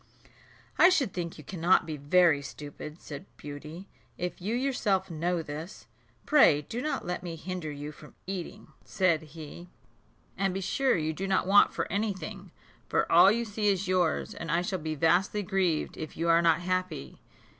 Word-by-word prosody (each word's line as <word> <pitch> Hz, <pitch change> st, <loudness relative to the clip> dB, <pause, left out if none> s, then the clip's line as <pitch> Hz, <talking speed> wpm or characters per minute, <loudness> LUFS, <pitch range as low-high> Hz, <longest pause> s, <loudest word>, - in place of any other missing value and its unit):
"I 360 Hz, -, +9 dB
should 285 Hz, -, +1 dB
think 170 Hz, -2 st, -4 dB
you 155 Hz, -, -11 dB
cannot 180 Hz, +2 st, +2 dB
be 155 Hz, -1 st, -4 dB
very 150 Hz, +1 st, +3 dB
stupid," 150 Hz, +3 st, -9 dB
said 145 Hz, -2 st, -9 dB
Beauty, 150 Hz, +6 st, -9 dB, 0.3 s
"if 180 Hz, 0 st, -4 dB
you 210 Hz, +6 st, -1 dB
yourself 215 Hz, -8 st, 0 dB
know 170 Hz, +1 st, -1 dB
this." 155 Hz, +6 st, -8 dB, 0.4 s
"Pray 155 Hz, -, +5 dB
do 230 Hz, +11 st, -5 dB
not 305 Hz, +2 st, -2 dB
let 180 Hz, +1 st, -3 dB
me 175 Hz, -2 st, -6 dB
hinder 180 Hz, -1 st, -5 dB
you 145 Hz, +1 st, -6 dB
from 150 Hz, 0 st, -15 dB
eating," 185 Hz, -3 st, -6 dB
said 185 Hz, -6 st, +1 dB
he; 160 Hz, +2 st, -10 dB, 0.7 s
"and 195 Hz, -2 st, -1 dB
be -, -, -1 dB
sure 260 Hz, +7 st, +1 dB
you 160 Hz, 0 st, -1 dB
do 190 Hz, +5 st, -4 dB
not 190 Hz, -1 st, +1 dB
want 200 Hz, +2 st, +6 dB
for -, -, -2 dB
any 205 Hz, +1 st, 0 dB
thing; 195 Hz, +2 st, -8 dB, 0.4 s
for -, -, +1 dB
all 175 Hz, +4 st, +8 dB
you 235 Hz, +2 st, 0 dB
see 210 Hz, -1 st, -2 dB
is 195 Hz, -1 st, +1 dB
yours, 180 Hz, -3 st, +1 dB
and 165 Hz, -, -7 dB
I 170 Hz, +2 st, +2 dB
shall 185 Hz, +1 st, -2 dB
be 155 Hz, 0 st, -3 dB
vastly 180 Hz, +7 st, +2 dB
grieved 180 Hz, -4 st, 0 dB
if 155 Hz, -, -7 dB
you 170 Hz, +1 st, 0 dB
are 165 Hz, 0 st, +5 dB
not 170 Hz, 0 st, +3 dB
happy." 185 Hz, -3 st, -3 dB
175 Hz, 180 wpm, -29 LUFS, 155-195 Hz, 0.7 s, I